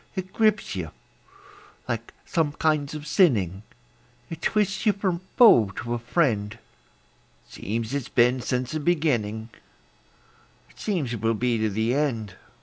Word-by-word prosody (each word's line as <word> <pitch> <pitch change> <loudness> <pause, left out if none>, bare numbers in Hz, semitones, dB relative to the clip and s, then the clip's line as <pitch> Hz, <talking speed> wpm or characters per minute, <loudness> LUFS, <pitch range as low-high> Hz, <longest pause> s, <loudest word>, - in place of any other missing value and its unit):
It 190 -1 -5
grips 215 -2 +1
you - - -4 1.0
like - - -4
some 160 -4 0
kinds 155 -1 0
of 150 -1 -7
sinning; 105 - +2 0.7
It 165 0 -7
twists 210 +1 0
you 210 - +5
from 190 -4 -2 0.2
foe 170 - +7
to 120 0 -4
a 120 - -2
friend; 115 -6 0 0.9
It - - -24
seems 115 +4 -4
it's 140 -4 -3
been 125 +1 +3
since 125 +1 -2
the 155 - -2
beginning; 120 -10 0 1.2
It - - -22
seems 165 - -2
it 115 - -5
will 115 0 +1
be 120 +1 0
to 110 0 +1
the 110 +4 0
end. 125 -8 -1
130 Hz, 145 wpm, -25 LUFS, 115-170 Hz, 1.2 s, foe